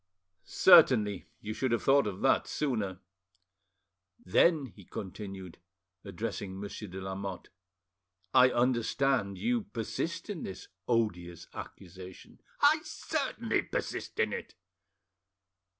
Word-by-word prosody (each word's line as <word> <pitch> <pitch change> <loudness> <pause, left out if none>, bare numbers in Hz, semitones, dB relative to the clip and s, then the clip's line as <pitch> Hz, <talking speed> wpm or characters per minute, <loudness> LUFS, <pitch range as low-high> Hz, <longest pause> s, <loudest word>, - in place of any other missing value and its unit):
"Certainly; 110 - +5
you 110 +1 -4
should 130 +2 -1
have 120 -3 0
thought 140 -2 +4
of 100 -2 -5
that 135 - +3
sooner." 110 -10 -2 1.2
"Then," 150 - +4
he 105 -5 -14
continued, 95 -1 -8 0.4
addressing 100 -1 -5
Monsieur 100 +1 -6
de 95 +1 -7
Lamotte, 95 -1 -6 0.8
"I 130 -1 +7
understand 120 -3 +1
you 240 0 0
persist 165 - -4
in 205 -6 -5
this 95 - -7 0.2
odious 90 -8 -1
accusation?" 95 0 -11 0.2
"I - - +6
certainly - - -2
persist - - -4
in - - +2
it." - - -6
105 Hz, 105 wpm, -30 LUFS, 95-130 Hz, 1.2 s, I